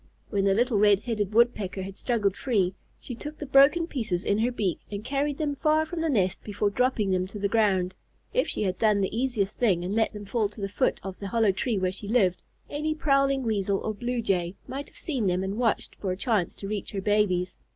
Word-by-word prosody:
When 200 Hz, -2 st, +1 dB
the 195 Hz, -1 st, +3 dB
little 240 Hz, -1 st, +2 dB
Red 205 Hz, -1 st, +5 dB
headed 215 Hz, -4 st, -2 dB
Woodpecker 215 Hz, -4 st, +2 dB
had 195 Hz, 0 st, -7 dB
struggled 205 Hz, -4 st, 0 dB
free, 200 Hz, -8 st, +1 dB, 0.3 s
she 250 Hz, -, -7 dB
took 295 Hz, +6 st, -7 dB
the 295 Hz, -, -6 dB
broken 280 Hz, +5 st, +5 dB
pieces 220 Hz, -, -2 dB
in 205 Hz, -, +1 dB
her 240 Hz, +3 st, +2 dB
beak 200 Hz, -8 st, -1 dB
and 205 Hz, 0 st, -5 dB
carried 280 Hz, +2 st, -1 dB
them 290 Hz, -3 st, -2 dB
far 310 Hz, +1 st, +2 dB
from 325 Hz, +1 st, -4 dB
the 325 Hz, -, 0 dB
nest 190 Hz, -8 st, +1 dB
before 205 Hz, -1 st, -1 dB
dropping 235 Hz, -3 st, +1 dB
them 185 Hz, 0 st, +1 dB
to 200 Hz, -, -9 dB
the 200 Hz, 0 st, 0 dB
ground. 195 Hz, -4 st, +2 dB, 0.4 s
If -, -, +2 dB
she -, -, -2 dB
had 185 Hz, -2 st, -1 dB
done 210 Hz, -2 st, +3 dB
the 195 Hz, +2 st, -1 dB
easiest 230 Hz, -5 st, -1 dB
thing 185 Hz, -8 st, +2 dB
and 190 Hz, -, -2 dB
let 225 Hz, 0 st, +2 dB
them 210 Hz, -1 st, -8 dB
fall 215 Hz, +1 st, 0 dB
by 210 Hz, -, -17 dB
the 200 Hz, -2 st, -3 dB
foot 200 Hz, -, 0 dB
of 190 Hz, -1 st, -7 dB
the 200 Hz, -, -5 dB
hollow 220 Hz, 0 st, +3 dB
tree 215 Hz, +3 st, -1 dB
where 185 Hz, -1 st, 0 dB
she 200 Hz, +2 st, -7 dB
lived, 200 Hz, -6 st, +2 dB, 0.3 s
any 310 Hz, +1 st, -2 dB
prowling 275 Hz, -3 st, +2 dB
Weasel 200 Hz, -4 st, 0 dB
or 215 Hz, -, -3 dB
Blue 240 Hz, +3 st, -3 dB
Jay 180 Hz, -3 st, 0 dB
might 275 Hz, +2 st, -5 dB
have -, -, -19 dB
seen 260 Hz, -, -1 dB
them 180 Hz, +1 st, +1 dB
and 195 Hz, +4 st, -3 dB
watched 230 Hz, -4 st, 0 dB
for 190 Hz, -, -2 dB
a 185 Hz, -, -3 dB
chance 210 Hz, -6 st, 0 dB
to 195 Hz, -, -7 dB
reach 210 Hz, 0 st, -4 dB
her 195 Hz, -, -2 dB
babies. 190 Hz, -3 st, +1 dB
210 Hz, 235 wpm, -27 LUFS, 195-250 Hz, 0.4 s, Red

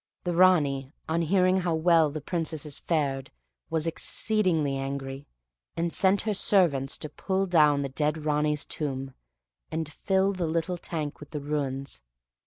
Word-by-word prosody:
The 175 Hz, -, -1 dB
Ranee, 145 Hz, -7 st, +3 dB, 0.2 s
on 165 Hz, +1 st, 0 dB
hearing 185 Hz, +2 st, +3 dB
how 175 Hz, -3 st, 0 dB
well 165 Hz, -1 st, +4 dB
the 150 Hz, +1 st, -6 dB
Princesses 160 Hz, -3 st, -2 dB
fared, 140 Hz, -5 st, -1 dB, 0.4 s
was 160 Hz, -1 st, 0 dB
exceedingly 165 Hz, -3 st, 0 dB
angry, 135 Hz, 0 st, -5 dB, 0.5 s
and 170 Hz, 0 st, 0 dB
sent 195 Hz, +1 st, +3 dB
her 215 Hz, -, 0 dB
servants 170 Hz, -10 st, +2 dB
to -, -, -5 dB
pull 190 Hz, +6 st, -1 dB
down 150 Hz, -5 st, +4 dB
the 140 Hz, -, -3 dB
dead 150 Hz, +3 st, -1 dB
Ranee's 150 Hz, -1 st, +1 dB
tomb, 135 Hz, -3 st, -3 dB, 0.6 s
and 160 Hz, 0 st, -2 dB
fill 190 Hz, +5 st, +1 dB
the 180 Hz, -3 st, -2 dB
little 165 Hz, +2 st, -1 dB
tank 155 Hz, -4 st, -4 dB
with 150 Hz, -, -11 dB
the 150 Hz, -, -4 dB
ruins. 140 Hz, -, -3 dB
155 Hz, 150 wpm, -27 LUFS, 140-175 Hz, 0.6 s, well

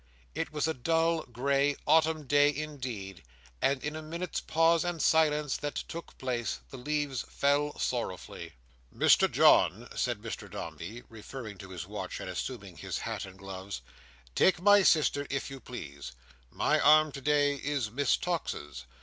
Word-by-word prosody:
It -, -, -3 dB
was 150 Hz, 0 st, 0 dB
a 160 Hz, -, 0 dB
dull, 165 Hz, +4 st, +1 dB
grey, 140 Hz, +3 st, +1 dB
autumn 160 Hz, 0 st, +3 dB
day 145 Hz, +1 st, +5 dB
indeed, 130 Hz, -, -5 dB, 0.4 s
and 135 Hz, -1 st, +1 dB
in 150 Hz, +1 st, -3 dB
a 155 Hz, -, -5 dB
minute's 170 Hz, +3 st, -4 dB
pause 165 Hz, +1 st, +3 dB
and 175 Hz, -2 st, -2 dB
silence 150 Hz, -3 st, +3 dB
that 145 Hz, 0 st, -4 dB
took 170 Hz, 0 st, -6 dB
place, 125 Hz, -3 st, -2 dB
the 135 Hz, -, -7 dB
leaves 145 Hz, 0 st, -2 dB
fell 145 Hz, +1 st, +1 dB
sorrowfully. 115 Hz, -7 st, -4 dB, 0.4 s
"Mr -, -, +4 dB
John," 110 Hz, +8 st, +5 dB
said 120 Hz, -4 st, -1 dB
Mr 110 Hz, -2 st, -7 dB
Dombey, 90 Hz, +4 st, -7 dB
referring 110 Hz, -2 st, -9 dB
to 95 Hz, -, -9 dB
his 90 Hz, -2 st, -6 dB
watch, 95 Hz, -2 st, -6 dB
and 95 Hz, -, -5 dB
assuming 100 Hz, -2 st, -5 dB
his -, -, -4 dB
hat -, -, -4 dB
and 95 Hz, 0 st, -12 dB
gloves. 95 Hz, -5 st, -7 dB, 0.5 s
"Take 185 Hz, -, +4 dB
my 205 Hz, +2 st, +6 dB
sister, 150 Hz, -5 st, +3 dB
if 135 Hz, 0 st, -3 dB
you 135 Hz, -, -7 dB
please: 70 Hz, -, -8 dB, 0.4 s
my -, -, +1 dB
arm 155 Hz, 0 st, +6 dB
today 145 Hz, +1 st, +2 dB
is 140 Hz, -6 st, -2 dB
Miss 140 Hz, +4 st, +2 dB
Tox's. 75 Hz, -, -4 dB
140 Hz, 155 wpm, -30 LUFS, 105-155 Hz, 0.5 s, my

